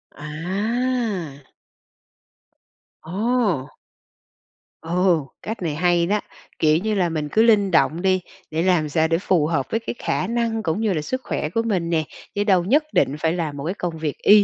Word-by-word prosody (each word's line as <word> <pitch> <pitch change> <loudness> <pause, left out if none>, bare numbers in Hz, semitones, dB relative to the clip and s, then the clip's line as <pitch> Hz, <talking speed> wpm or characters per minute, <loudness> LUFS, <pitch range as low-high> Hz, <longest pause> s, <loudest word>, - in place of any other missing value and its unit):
À! 185 - -2 1.5
Ồ! 195 - 0 1.1
Ồ, 170 -3 +1 0.2
cách 220 -2 -5
này 160 -4 -2
hay 175 +1 +2
đó, 205 +4 +1 0.4
kiểu 155 0 +4
như 215 +5 -1
là, 180 -3 +2
mình 155 -2 -3
cứ 220 - +4
linh 205 -4 +4
động 165 0 +3
đi, 185 -1 +2 0.3
để 160 +1 0
làm 175 -5 +2
sao 160 +2 +2
để 165 - +2
phù 170 -4 +1
hợp 145 -5 0
với 225 - +1
cái 230 - -5
khả 185 - -1
năng 230 -1 -1
cũng 165 +4 -1
như 215 -3 +1
là 155 - -1
sức 255 - -3
khỏe 150 - -2
của 225 +6 0
mình 190 -7 -1
nè, 160 -2 +1 0.3
chứ 205 - +1
đâu 190 -4 +3
nhất 290 +10 +4
định 140 - +2
phải 160 +1 +1
làm 155 -5 -3
một 140 - -5
cái 180 - -1
công 170 -4 -4
việc 155 -2 -3
y 205 0 +6
180 Hz, 185 wpm, -22 LUFS, 160-210 Hz, 1.5 s, y